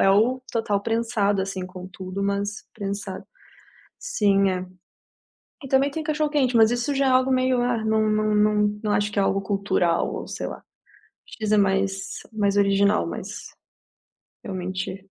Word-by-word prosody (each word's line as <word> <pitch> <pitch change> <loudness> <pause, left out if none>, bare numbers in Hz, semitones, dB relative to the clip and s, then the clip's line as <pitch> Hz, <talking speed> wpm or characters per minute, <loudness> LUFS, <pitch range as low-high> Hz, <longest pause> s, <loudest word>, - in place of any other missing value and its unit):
é 195 - +5
o 235 +6 +3
Total 220 -3 0
prensado, 225 -3 0
assim, 190 -1 -4
com 185 0 -9
tudo, 190 +1 -7
mas 200 +1 -2
prensado. 200 -2 -5 0.7
Sim, 200 - +2
é. 185 0 -2 1.0
E - - -6
também 270 +2 +3
tem 315 +3 -4
cachorro-quente, 295 -5 +1
mas 220 0 +6
isso 245 +4 -1
já 275 0 +2
é - - +4
algo 255 +1 +3
meio 255 -1 +2
ah, 240 -3 0
não 220 0 +2
não 215 0 +1
não 210 0 +2
não 210 - 0
acho 205 0 +1
que - - -2
é 200 - +4
algo 195 0 +1
cultural 195 -4 0
ou - - -5
sei - - -4
lá, - - -8 0.6
X 215 -1 -4
é 215 - +5
mais 195 -1 0 0.2
mais 205 -2 +1
original. 200 +1 +3
Mas, - - -6 1.0
realmente 185 0 -5
210 Hz, 160 wpm, -24 LUFS, 195-235 Hz, 1.0 s, mas